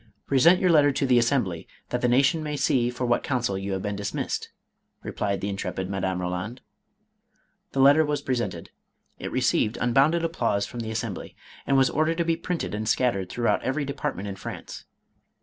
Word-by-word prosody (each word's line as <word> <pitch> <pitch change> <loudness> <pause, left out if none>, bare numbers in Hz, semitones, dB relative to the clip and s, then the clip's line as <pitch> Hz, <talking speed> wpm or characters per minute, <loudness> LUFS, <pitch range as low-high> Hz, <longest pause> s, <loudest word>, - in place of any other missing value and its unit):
" - - -45
Present 165 +7 +6
your 185 -2 +3
letter 145 -3 +5
to 135 - 0
the 125 -2 +4
Assembly, 115 - 0 0.2
that 125 - -2
the 125 - +2
nation 135 +6 +3
may 150 -1 -3
see 125 -3 +2
for 125 +1 -3
what 120 0 +2
counsel 120 -7 -1
you 95 +1 -3
have 95 - -3
been 105 -1 -2
dfemissed," 100 - -3 0.6
replied 100 -1 -2
the 100 - -2
intrepid 95 -1 -4
Madame 95 -1 -1
Roland. 90 +7 -4 1.1
The 135 - +2
letter 145 +4 +7
was 145 -1 -2
presented. 115 -11 -3 0.5
It - - -5
received 110 - +1
unbounded 140 +8 +3
applause 115 -11 0
from 120 - -8
the 115 -1 -4
Assembly, 110 0 -4 0.3
and 135 - +3
was 135 -1 +4
ordered 155 +2 +1
to 170 - +1
be 165 0 +2
printed 170 - -3
and 105 +1 -2
scattered 100 -8 +1
throughout 120 +3 0
every 140 +3 -1
department 140 -7 -4
in 100 -1 -6
France. - - -8
125 Hz, 185 wpm, -25 LUFS, 100-145 Hz, 1.1 s, letter